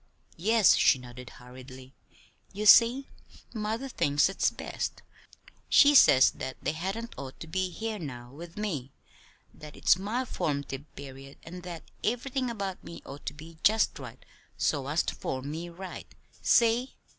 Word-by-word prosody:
"Yes," 215 Hz, +3 st, +5 dB
she -, -, +5 dB
nodded 125 Hz, 0 st, -11 dB
hurriedly. 130 Hz, +1 st, -13 dB, 0.6 s
"You 210 Hz, +2 st, -4 dB
see, 240 Hz, +5 st, +7 dB, 0.5 s
mother 220 Hz, +4 st, -3 dB
thinks 145 Hz, -, +2 dB
it's 195 Hz, -, +1 dB
best. -, -, -5 dB, 0.7 s
She 285 Hz, +1 st, +7 dB
says 135 Hz, -, +7 dB
that 130 Hz, -, -6 dB
they -, -, -1 dB
hadn't 195 Hz, +9 st, -4 dB
ought 135 Hz, -1 st, -8 dB
to -, -, -7 dB
be 185 Hz, +3 st, -2 dB
here 220 Hz, +4 st, -4 dB
now 125 Hz, -6 st, -8 dB
with 165 Hz, +5 st, -11 dB
me; 155 Hz, -12 st, -3 dB, 0.6 s
that 150 Hz, -1 st, -12 dB
it's 185 Hz, -, +4 dB
my 225 Hz, +7 st, -2 dB
form'tive 140 Hz, -, -3 dB
period, 135 Hz, 0 st, -10 dB
and 180 Hz, +2 st, -9 dB
that 175 Hz, -2 st, -8 dB, 0.2 s
everything 250 Hz, +2 st, -1 dB
about 195 Hz, -5 st, -5 dB
me 170 Hz, -, -10 dB
ought 140 Hz, -, -10 dB
to -, -, -2 dB
be 160 Hz, +2 st, -13 dB
just 220 Hz, +1 st, +3 dB
right -, -, -11 dB, 0.3 s
so 140 Hz, -3 st, 0 dB
as 155 Hz, +4 st, +1 dB
to -, -, -3 dB
form 135 Hz, +2 st, -4 dB
me 165 Hz, +3 st, -5 dB
right. 180 Hz, +2 st, -9 dB, 0.3 s
See?" 235 Hz, +2 st, +3 dB
170 Hz, 155 wpm, -29 LUFS, 140-220 Hz, 0.7 s, see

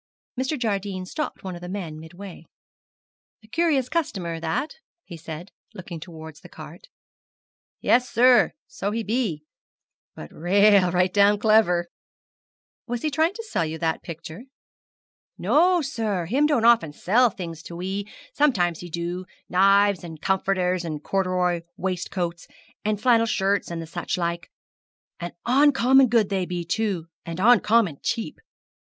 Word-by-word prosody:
Mr. 265 Hz, +4 st, -1 dB
Jardine 200 Hz, -5 st, -2 dB
stopped 305 Hz, +11 st, -5 dB
one 190 Hz, -1 st, -5 dB
of 175 Hz, -, -9 dB
the 175 Hz, -, -7 dB
men 175 Hz, -6 st, -5 dB
midway. 170 Hz, +1 st, -11 dB, 1.0 s
'A -, -, -18 dB
curious 305 Hz, -4 st, +1 dB
customer 190 Hz, -, -2 dB
that,' 165 Hz, -, -3 dB, 0.3 s
he 175 Hz, -, -10 dB
said, 165 Hz, +3 st, -8 dB, 0.2 s
looking 180 Hz, -3 st, -8 dB
towards 160 Hz, -2 st, -11 dB
the -, -, -14 dB
cart. -, -, -12 dB, 0.9 s
'Yes, 250 Hz, +1 st, +3 dB
sir, 250 Hz, +2 st, +5 dB
so -, -, -4 dB
he 225 Hz, +2 st, -2 dB
be; 210 Hz, -9 st, -1 dB, 0.7 s
but 75 Hz, -, -10 dB
rale 200 Hz, +2 st, +4 dB
right 180 Hz, +1 st, +1 dB
down 205 Hz, 0 st, +5 dB
clever.' 210 Hz, -5 st, +3 dB, 1.0 s
'Was 240 Hz, -1 st, -4 dB
he 305 Hz, -, 0 dB
trying 320 Hz, +6 st, +1 dB
to 455 Hz, -, -6 dB
sell 425 Hz, -, -1 dB
you 160 Hz, 0 st, -4 dB
that 160 Hz, -1 st, -1 dB
picture?' 165 Hz, +6 st, -9 dB, 0.9 s
'No, 350 Hz, +2 st, +3 dB
sir; 215 Hz, -9 st, -2 dB
him 270 Hz, -, +2 dB
don't 250 Hz, -7 st, +1 dB
often 230 Hz, -11 st, +4 dB
sell 235 Hz, +10 st, +3 dB
things 170 Hz, -5 st, -7 dB
to 170 Hz, -, -10 dB
we; 190 Hz, +3 st, -4 dB, 0.3 s
sometimes 180 Hz, -, +1 dB
him 175 Hz, -, -8 dB
do 170 Hz, +2 st, -4 dB, 0.2 s
knives, 195 Hz, 0 st, +4 dB
and 160 Hz, -2 st, -9 dB
comforters, 185 Hz, -1 st, 0 dB
and 155 Hz, -3 st, -5 dB
corderoy 180 Hz, -2 st, 0 dB, 0.2 s
waistcoats, 175 Hz, -1 st, -3 dB, 0.4 s
and 210 Hz, -1 st, -1 dB
flannel 230 Hz, -1 st, +3 dB
shirts, 200 Hz, -1 st, 0 dB
and 165 Hz, -1 st, -5 dB
such 175 Hz, +3 st, -3 dB
like, 170 Hz, -1 st, -3 dB, 0.7 s
and 175 Hz, 0 st, -6 dB
oncommon 265 Hz, 0 st, +5 dB
good 225 Hz, -3 st, +2 dB
they 190 Hz, -3 st, -1 dB
be, 175 Hz, -1 st, -4 dB
too, 190 Hz, -2 st, -1 dB, 0.2 s
and 170 Hz, +1 st, -6 dB
oncommon 215 Hz, -, +4 dB
cheap. 225 Hz, -, -3 dB
195 Hz, 145 wpm, -24 LUFS, 170-230 Hz, 1.0 s, sir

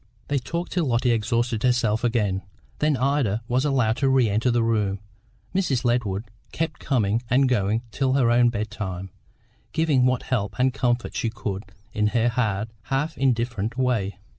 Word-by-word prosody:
They 140 Hz, -1 st, +1 dB
talked 170 Hz, +7 st, -4 dB
till 175 Hz, -3 st, 0 dB
Lotty 120 Hz, 0 st, +2 dB
exhausted 115 Hz, 0 st, 0 dB
herself 120 Hz, -3 st, +2 dB
again, 105 Hz, -5 st, +1 dB, 0.4 s
then 150 Hz, -2 st, +2 dB
Ida 130 Hz, -5 st, +1 dB
was 130 Hz, +3 st, +1 dB
allowed 125 Hz, -6 st, +2 dB
to 135 Hz, +1 st, +2 dB
re 130 Hz, -3 st, +4 dB
enter 110 Hz, +5 st, +1 dB
the 120 Hz, -1 st, +2 dB
room. 105 Hz, -4 st, 0 dB, 0.5 s
Mrs. 165 Hz, -11 st, 0 dB
Ledward 110 Hz, -3 st, 0 dB, 0.2 s
kept 160 Hz, -2 st, -3 dB
coming 115 Hz, -4 st, +1 dB
and 135 Hz, +2 st, +4 dB
going 110 Hz, -1 st, +1 dB
till 130 Hz, +4 st, 0 dB
her 125 Hz, -4 st, +3 dB
own 120 Hz, 0 st, +5 dB
bed 110 Hz, -2 st, -3 dB
time, 95 Hz, -3 st, -5 dB, 0.6 s
giving 150 Hz, -6 st, +3 dB
what 130 Hz, -1 st, 0 dB
help 105 Hz, -6 st, -2 dB
and 130 Hz, 0 st, +2 dB
comfort 120 Hz, -2 st, -1 dB
she 115 Hz, -, 0 dB
could 105 Hz, -2 st, -5 dB, 0.3 s
in 105 Hz, 0 st, +1 dB
her 115 Hz, +1 st, +3 dB
hard, 110 Hz, -3 st, -1 dB, 0.2 s
half 145 Hz, +4 st, -1 dB
indifferent 115 Hz, -3 st, 0 dB
way. 110 Hz, -7 st, 0 dB
120 Hz, 165 wpm, -24 LUFS, 110-130 Hz, 0.6 s, own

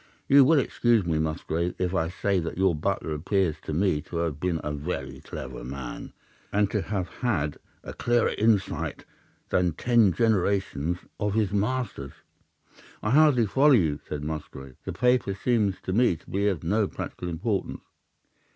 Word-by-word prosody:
You 140 Hz, 0 st, +7 dB
will 155 Hz, +4 st, +5 dB
excuse 120 Hz, -6 st, +2 dB
me, 80 Hz, -2 st, 0 dB
Musgrave, 80 Hz, +2 st, -2 dB
if 90 Hz, 0 st, -1 dB
I 80 Hz, -4 st, +1 dB
say 100 Hz, +1 st, 0 dB
that 85 Hz, 0 st, -4 dB
your 95 Hz, -1 st, +3 dB
butler 75 Hz, 0 st, -2 dB
appears 85 Hz, +1 st, 0 dB
to -, -, -6 dB
me 80 Hz, -1 st, +1 dB
to -, -, -7 dB
have 80 Hz, -4 st, -2 dB
been 85 Hz, -1 st, -1 dB
a 75 Hz, -, -3 dB
very 70 Hz, -3 st, -4 dB
clever 60 Hz, -1 st, -7 dB
man, 65 Hz, 0 st, -7 dB, 0.4 s
and 105 Hz, -1 st, +1 dB
to 105 Hz, -, 0 dB
have 95 Hz, -2 st, -2 dB
had 80 Hz, -, -2 dB, 0.3 s
a -, -, -7 dB
clearer 120 Hz, -1 st, +1 dB
insight 105 Hz, -3 st, 0 dB, 0.4 s
than 90 Hz, -2 st, +2 dB
ten 115 Hz, +1 st, +3 dB
generations 95 Hz, -5 st, +1 dB, 0.2 s
of 105 Hz, -1 st, -1 dB
his 105 Hz, -3 st, +1 dB
masters.' 105 Hz, -, -2 dB, 0.9 s
"'I 105 Hz, -, 0 dB
hardly 140 Hz, -4 st, +5 dB
follow 140 Hz, +7 st, +4 dB
you,' 80 Hz, -, +2 dB
said 75 Hz, -1 st, -4 dB
Musgrave. 70 Hz, -4 st, -6 dB
'The -, -, -4 dB
paper 125 Hz, -5 st, +2 dB
seems 105 Hz, -3 st, +1 dB
to 95 Hz, -, -3 dB
me 115 Hz, -3 st, +3 dB
to 80 Hz, -, -18 dB
be 100 Hz, +2 st, 0 dB
of 95 Hz, -6 st, -1 dB
no 100 Hz, +5 st, +1 dB
practical 90 Hz, -, -6 dB
importance. 95 Hz, +5 st, -2 dB
95 Hz, 165 wpm, -26 LUFS, 80-110 Hz, 0.9 s, You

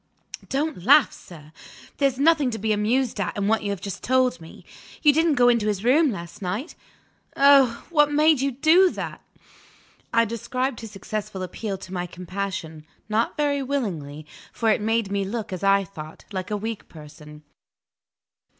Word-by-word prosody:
"Don't 285 Hz, -, -2 dB
laugh, 280 Hz, +3 st, +6 dB
sir! 155 Hz, -3 st, -14 dB, 0.5 s
There's 275 Hz, -3 st, +1 dB
nothing 300 Hz, -1 st, +3 dB
to 225 Hz, -, -4 dB
be 220 Hz, +1 st, 0 dB
amused 225 Hz, +3 st, 0 dB
at 200 Hz, +3 st, -2 dB
in 200 Hz, 0 st, -1 dB
what 220 Hz, 0 st, +2 dB
you 205 Hz, -, -3 dB
have 200 Hz, -3 st, -4 dB
just 200 Hz, -2 st, -6 dB
told 255 Hz, -8 st, +1 dB
me. 160 Hz, -, -13 dB, 0.4 s
You 295 Hz, -2 st, +6 dB
didn't 320 Hz, 0 st, +2 dB
go 245 Hz, -1 st, +4 dB
into 235 Hz, -3 st, +3 dB
his 205 Hz, -1 st, -1 dB
room 290 Hz, +6 st, +4 dB
last 175 Hz, +1 st, -8 dB
night? 205 Hz, -, -4 dB, 0.6 s
Oh, 275 Hz, -4 st, +5 dB
what 295 Hz, -3 st, +4 dB
made 305 Hz, -1 st, +4 dB
you 275 Hz, 0 st, 0 dB
do 320 Hz, +8 st, +4 dB
that!" -, -, -6 dB, 0.9 s
I 230 Hz, 0 st, +3 dB
described 255 Hz, +3 st, -3 dB
his 225 Hz, -, -8 dB
successful 205 Hz, -1 st, -5 dB
appeal 195 Hz, +2 st, -5 dB
to 185 Hz, 0 st, -11 dB
my 180 Hz, -1 st, -3 dB
compassion 180 Hz, -3 st, -6 dB, 0.3 s
not 220 Hz, +2 st, 0 dB
very 290 Hz, -1 st, 0 dB
willingly, 175 Hz, -, -4 dB, 0.3 s
for 225 Hz, -1 st, +1 dB
it 210 Hz, -, +1 dB
made 220 Hz, -1 st, 0 dB
me 200 Hz, 0 st, 0 dB
look 210 Hz, 0 st, -5 dB
(as 185 Hz, -, -6 dB
I 195 Hz, 0 st, +4 dB
thought) 155 Hz, -5 st, -11 dB
like 185 Hz, -2 st, -4 dB
a 210 Hz, -, -1 dB
weak 220 Hz, +1 st, -6 dB
person. 150 Hz, -1 st, -13 dB
220 Hz, 170 wpm, -24 LUFS, 190-270 Hz, 0.9 s, laugh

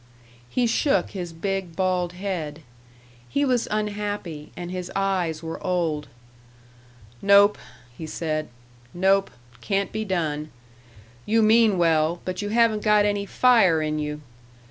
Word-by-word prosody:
He 250 Hz, -, +1 dB
shook 270 Hz, +5 st, +1 dB
his 180 Hz, -4 st, -5 dB
big, 185 Hz, 0 st, -3 dB
bald 180 Hz, -1 st, 0 dB
head. 170 Hz, -5 st, -5 dB, 0.7 s
He 285 Hz, 0 st, +1 dB
was 250 Hz, -3 st, +1 dB
unhappy 205 Hz, -7 st, -3 dB
and 175 Hz, 0 st, -6 dB
his 180 Hz, -1 st, -5 dB
eyes 180 Hz, -5 st, -1 dB
were 165 Hz, 0 st, -6 dB
old. 165 Hz, -5 st, -1 dB, 1.1 s
"Nope," 200 Hz, +1 st, +5 dB, 0.4 s
he 160 Hz, -, -7 dB
said; 155 Hz, -1 st, -3 dB, 0.5 s
"nope. 195 Hz, +2 st, +3 dB, 0.3 s
Can't 200 Hz, -1 st, -1 dB
be 220 Hz, -, -3 dB
done. 155 Hz, -6 st, -2 dB, 0.8 s
You 225 Hz, +1 st, +3 dB
mean 220 Hz, -2 st, +5 dB
well, 165 Hz, 0 st, +2 dB
but 185 Hz, +2 st, -3 dB
you 205 Hz, -, -3 dB
haven't 225 Hz, -1 st, +3 dB
got 210 Hz, -1 st, +4 dB
any 205 Hz, -1 st, -1 dB
fire 225 Hz, -11 st, +4 dB
in 155 Hz, 0 st, -2 dB
you. 150 Hz, 0 st, -4 dB
185 Hz, 130 wpm, -24 LUFS, 165-210 Hz, 1.1 s, Nope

